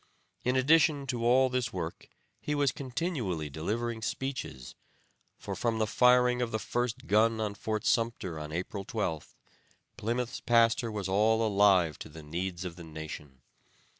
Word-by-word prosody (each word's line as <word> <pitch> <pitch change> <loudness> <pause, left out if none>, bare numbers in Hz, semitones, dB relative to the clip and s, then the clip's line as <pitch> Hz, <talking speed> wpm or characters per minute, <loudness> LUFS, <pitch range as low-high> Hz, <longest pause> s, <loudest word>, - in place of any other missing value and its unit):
In 125 +1 +1
addition 145 +1 +4
to 120 -3 -3
all 130 +2 +5
this 125 -2 -1
work 85 -5 -6 0.3
he 150 - -2
was 140 -3 +2
continually 125 - -3
delivering 110 +9 -3
speeches; 130 - -4 0.6
for - - -5
from 115 -2 0
the 110 - +2
firing 125 +2 +4
of 120 - 0
the 110 - 0
first 120 +1 -2
gun 110 +2 +3
on 105 -2 -1
Fort 110 0 -3
Sumpter 115 -8 0
on 75 0 -6
April 90 +4 -4
12th, 90 -7 -3 0.6
Plymouth's 120 +2 -2
pastor 115 -1 +3
was 105 -3 -3
all 110 +4 +3
alive 100 -6 +4
to - - -8
the 80 0 -11
needs 85 +3 -4
of 85 -1 -6
the 85 - -9
nation. 75 -4 -9
110 Hz, 155 wpm, -30 LUFS, 90-125 Hz, 0.6 s, all